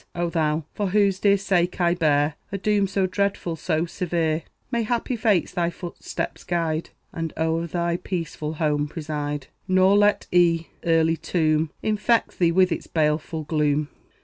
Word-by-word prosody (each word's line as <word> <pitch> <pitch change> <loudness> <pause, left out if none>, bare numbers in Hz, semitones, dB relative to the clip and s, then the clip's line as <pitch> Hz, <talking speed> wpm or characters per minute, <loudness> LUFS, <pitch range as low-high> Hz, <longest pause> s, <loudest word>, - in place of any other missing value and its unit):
O 175 -1 -1
thou, 155 -1 0
for 205 - -1
whose 200 -1 +2
dear 200 0 +4
sake 180 -3 0
I 175 -1 +3
bear 150 -3 +2 0.2
A 200 - -2
doom 205 0 +1
so 195 0 0
dreadful, 190 -2 -1
so 160 0 -1
severe, 170 -2 -1 0.3
May 235 -1 +1
happy 240 +2 -1
fates 215 -7 +2
thy 170 -1 0
footsteps 175 0 -6
guide, 165 -2 -1 0.2
And 165 -1 -4
o'er 160 +1 0
thy 170 0 -1
peaceful 165 -4 -4
home 150 -2 0
preside; 150 -3 -4 0.2
Nor 185 +1 +4
let 205 0 +3
E 170 -2 +3
a's - - -9
early 165 0 +3
tomb 155 -2 +1
Infect 215 +2 +1
thee 170 -2 +4
with 185 +1 +4
its - - -3
baleful 155 0 0
gloom. 150 -1 0
170 Hz, 160 wpm, -24 LUFS, 155-190 Hz, 0.3 s, dear